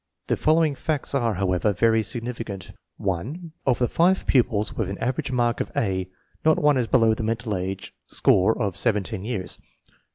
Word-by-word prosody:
The -, -, +1 dB
following 155 Hz, -1 st, +3 dB
facts 145 Hz, +1 st, -2 dB
are, 120 Hz, -6 st, +1 dB
however, 95 Hz, +2 st, +1 dB
very 115 Hz, +4 st, +3 dB
significant: 115 Hz, -3 st, -5 dB, 0.3 s
1. 130 Hz, -, -3 dB, 0.2 s
Of 125 Hz, -, +4 dB
the 120 Hz, -, +1 dB
5 180 Hz, +7 st, +2 dB
pupils 115 Hz, -5 st, +2 dB
with -, -, -1 dB
an 100 Hz, -, -4 dB
average 135 Hz, +2 st, -2 dB
mark 120 Hz, -2 st, +1 dB
of -, -, -3 dB
A, 95 Hz, -3 st, -1 dB, 0.3 s
not 160 Hz, +1 st, +4 dB
one 150 Hz, -4 st, +3 dB
is 120 Hz, -3 st, 0 dB
below 115 Hz, -3 st, +4 dB
the 110 Hz, -, -4 dB
mental 110 Hz, 0 st, -1 dB
age 95 Hz, +1 st, -4 dB
score 100 Hz, +6 st, +3 dB
of 100 Hz, -6 st, -1 dB
17 105 Hz, -3 st, 0 dB
years.. 105 Hz, -5 st, -4 dB
115 Hz, 170 wpm, -24 LUFS, 100-130 Hz, 0.3 s, Of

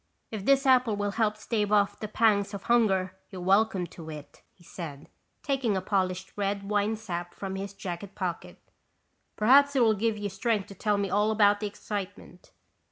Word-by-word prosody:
"If 210 Hz, -3 st, -5 dB
this 275 Hz, 0 st, +4 dB
apple 255 Hz, -4 st, +4 dB
will 205 Hz, 0 st, -1 dB
help 215 Hz, 0 st, 0 dB
stave 215 Hz, -1 st, -1 dB
off 205 Hz, -1 st, +2 dB
the 215 Hz, -, -4 dB
pangs 205 Hz, -2 st, +2 dB
of 200 Hz, -, -7 dB
hunger, 195 Hz, -6 st, +2 dB, 0.2 s
you're 190 Hz, -, -8 dB
welcome 195 Hz, 0 st, +2 dB
to 165 Hz, -1 st, -11 dB
it," 150 Hz, -2 st, -10 dB
he 175 Hz, -, -24 dB
said, 155 Hz, -5 st, -8 dB, 0.4 s
taking 260 Hz, -8 st, 0 dB
a -, -, +1 dB
polished 185 Hz, -1 st, -1 dB
red 200 Hz, 0 st, -2 dB
Winesap 205 Hz, -4 st, -2 dB
from 190 Hz, -1 st, -5 dB
his 195 Hz, 0 st, -5 dB
jacket 195 Hz, +1 st, -6 dB
pocket. 180 Hz, -4 st, -4 dB, 0.8 s
"Perhaps 280 Hz, +6 st, +5 dB
it 255 Hz, -, +4 dB
will 220 Hz, -1 st, +4 dB
give 220 Hz, +1 st, 0 dB
you 205 Hz, -1 st, -3 dB
strength 200 Hz, +1 st, -1 dB
to -, -, -8 dB
tell 205 Hz, +2 st, 0 dB
me 200 Hz, -1 st, -2 dB
all 210 Hz, +1 st, +2 dB
about 205 Hz, -1 st, +4 dB
the 210 Hz, -, -2 dB
excitement." 200 Hz, -3 st, -7 dB
205 Hz, 180 wpm, -28 LUFS, 190-220 Hz, 0.8 s, Perhaps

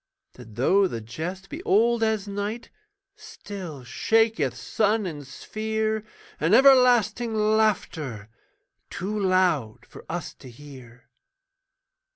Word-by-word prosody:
That 115 Hz, -4 st, -14 dB
though 190 Hz, -, +3 dB
the 115 Hz, -, -5 dB
jest 165 Hz, -, -6 dB
be 305 Hz, +4 st, -7 dB
old 235 Hz, -, +2 dB
as 220 Hz, -2 st, 0 dB
night, 205 Hz, +4 st, -5 dB, 0.4 s
Still 175 Hz, -10 st, -9 dB
shaketh 165 Hz, -, +1 dB
sun 210 Hz, -, 0 dB
and 145 Hz, -6 st, -6 dB
sphere 220 Hz, +6 st, -3 dB, 0.4 s
An 165 Hz, +7 st, +3 dB
everlasting 245 Hz, -4 st, +4 dB
laughter 210 Hz, -, 0 dB, 0.6 s
Too 210 Hz, +3 st, -4 dB
loud 185 Hz, -, +1 dB
for -, -, -13 dB
us 170 Hz, +1 st, -5 dB
to 130 Hz, -, -12 dB
hear. 125 Hz, -2 st, -14 dB
195 Hz, 110 wpm, -25 LUFS, 140-220 Hz, 0.6 s, everlasting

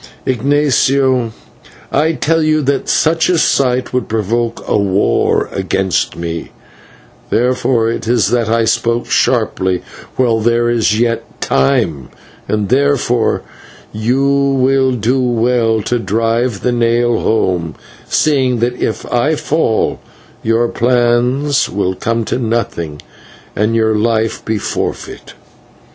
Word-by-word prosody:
Ignatio, 130 Hz, -1 st, +1 dB, 0.6 s
I 155 Hz, +4 st, +2 dB
tell 165 Hz, +1 st, 0 dB
you 155 Hz, -1 st, +1 dB
that 140 Hz, +1 st, -1 dB
such 165 Hz, +1 st, +2 dB
a 180 Hz, -, +2 dB
sight 130 Hz, -5 st, +1 dB
would 125 Hz, -2 st, -1 dB
provoke 115 Hz, +2 st, -2 dB
a -, -, +1 dB
war 100 Hz, -1 st, +1 dB
against 95 Hz, -2 st, -1 dB
me, 85 Hz, 0 st, -4 dB
and -, -, -19 dB, 0.8 s
therefore 125 Hz, -1 st, +1 dB
it 115 Hz, -, -5 dB
is 115 Hz, -5 st, +2 dB
that 120 Hz, -2 st, +1 dB
I 115 Hz, 0 st, +2 dB
spoke 115 Hz, +1 st, 0 dB
sharply 95 Hz, -1 st, 0 dB, 0.3 s
while 120 Hz, -3 st, +2 dB
there 120 Hz, +1 st, +1 dB
is 110 Hz, -2 st, +1 dB
yet 115 Hz, -1 st, -2 dB
time, 70 Hz, +1 st, 0 dB, 0.4 s
and 105 Hz, -2 st, -1 dB
therefore 130 Hz, -3 st, +1 dB, 0.5 s
you 120 Hz, +6 st, 0 dB
will 135 Hz, -1 st, +2 dB
do 125 Hz, +3 st, 0 dB
well 120 Hz, -2 st, +1 dB
to 120 Hz, +3 st, -1 dB
drive 115 Hz, +2 st, -1 dB
the 125 Hz, -, 0 dB
nail 120 Hz, 0 st, +1 dB
home, 90 Hz, -7 st, 0 dB, 0.3 s
seeing 130 Hz, -5 st, +2 dB
that 120 Hz, +2 st, -2 dB
if 110 Hz, -, -2 dB
I 145 Hz, +6 st, +2 dB
fall 150 Hz, -7 st, 0 dB, 0.4 s
your 115 Hz, +1 st, +1 dB
plans 125 Hz, +4 st, +1 dB
will 95 Hz, -1 st, -1 dB
come 115 Hz, +4 st, -2 dB
to 125 Hz, -, -2 dB
nothing, 105 Hz, -, -3 dB, 0.5 s
and 110 Hz, +2 st, 0 dB
your 110 Hz, -1 st, +2 dB
life 110 Hz, 0 st, 0 dB
be 110 Hz, -1 st, -2 dB
forfeit." -, -, -5 dB
120 Hz, 125 wpm, -15 LUFS, 110-130 Hz, 0.8 s, I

